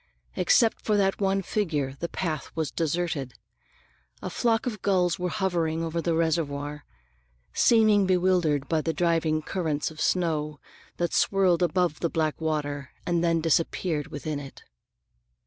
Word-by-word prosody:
Except 240 Hz, -, +3 dB
for 210 Hz, -1 st, +2 dB
that 195 Hz, 0 st, +1 dB
one 195 Hz, 0 st, +1 dB
figure, 155 Hz, -11 st, -1 dB
the 170 Hz, -, -3 dB
path 155 Hz, -6 st, -3 dB
was 160 Hz, -5 st, -2 dB
deserted. 160 Hz, -1 st, -2 dB, 0.9 s
A -, -, -4 dB
flock 230 Hz, -1 st, +1 dB
of 215 Hz, -6 st, -4 dB
gulls 185 Hz, -2 st, +1 dB
were 180 Hz, 0 st, -1 dB
hovering 170 Hz, -5 st, -1 dB
over 165 Hz, +1 st, -2 dB
the 165 Hz, 0 st, 0 dB
reservoir, 150 Hz, -3 st, -1 dB, 0.7 s
seeming 215 Hz, -4 st, +4 dB
bewildered 175 Hz, -6 st, +2 dB
by 160 Hz, -2 st, +1 dB
the 165 Hz, +1 st, -1 dB
driving 160 Hz, -1 st, +1 dB
currents 155 Hz, -4 st, -2 dB
of 155 Hz, -, -9 dB
snow 155 Hz, -4 st, 0 dB, 0.4 s
that 175 Hz, -1 st, -1 dB, 0.2 s
whirled 185 Hz, -3 st, +2 dB
above 175 Hz, -2 st, +1 dB
the 170 Hz, -, 0 dB
black 155 Hz, -1 st, -1 dB
water 145 Hz, -3 st, -2 dB, 0.2 s
and 170 Hz, -1 st, +1 dB
then 165 Hz, -1 st, +2 dB
disappeared 165 Hz, -1 st, 0 dB
within 145 Hz, 0 st, -4 dB
it. 140 Hz, -1 st, -11 dB
165 Hz, 145 wpm, -26 LUFS, 155-185 Hz, 0.9 s, seeming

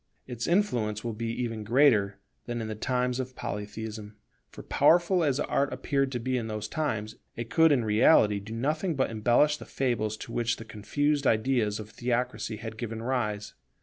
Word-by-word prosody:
Its 120 Hz, -2 st, -4 dB
influence 120 Hz, -, +1 dB
will 115 Hz, -1 st, -3 dB
be 115 Hz, +2 st, -4 dB
even 115 Hz, -2 st, -3 dB
greater 110 Hz, -4 st, +3 dB, 0.3 s
than 120 Hz, -1 st, -3 dB
in 110 Hz, -, -4 dB
the 110 Hz, -, -3 dB
times 125 Hz, +3 st, -1 dB
of 130 Hz, 0 st, -5 dB
Polytheism; 105 Hz, 0 st, -6 dB, 0.3 s
for -, -, -11 dB
powerful 175 Hz, +1 st, +3 dB
as 140 Hz, -2 st, +1 dB
Art 140 Hz, -1 st, 0 dB
appeared 135 Hz, -2 st, -1 dB
to 125 Hz, -, -1 dB
be 130 Hz, +2 st, -1 dB
in 115 Hz, -2 st, -3 dB
those 110 Hz, -1 st, -4 dB
times, 110 Hz, -6 st, -3 dB, 0.2 s
it 115 Hz, -1 st, -6 dB
could 165 Hz, -1 st, +5 dB
in 125 Hz, -5 st, +2 dB
reality 105 Hz, -1 st, +4 dB
do 105 Hz, +3 st, -8 dB
nothing 155 Hz, +8 st, -1 dB
but 130 Hz, -4 st, 0 dB
embellish 120 Hz, +7 st, +3 dB
the -, -, -10 dB
fables 110 Hz, -5 st, -1 dB
to 115 Hz, -, -9 dB
which 120 Hz, 0 st, 0 dB
the 115 Hz, -, -9 dB
confused 140 Hz, +7 st, 0 dB
ideas 110 Hz, -2 st, +1 dB
of 110 Hz, 0 st, -8 dB
theocracy 125 Hz, -1 st, -2 dB
had 110 Hz, 0 st, -7 dB
given 115 Hz, -1 st, -4 dB
rise. 105 Hz, -5 st, -2 dB
120 Hz, 180 wpm, -28 LUFS, 110-135 Hz, 0.3 s, could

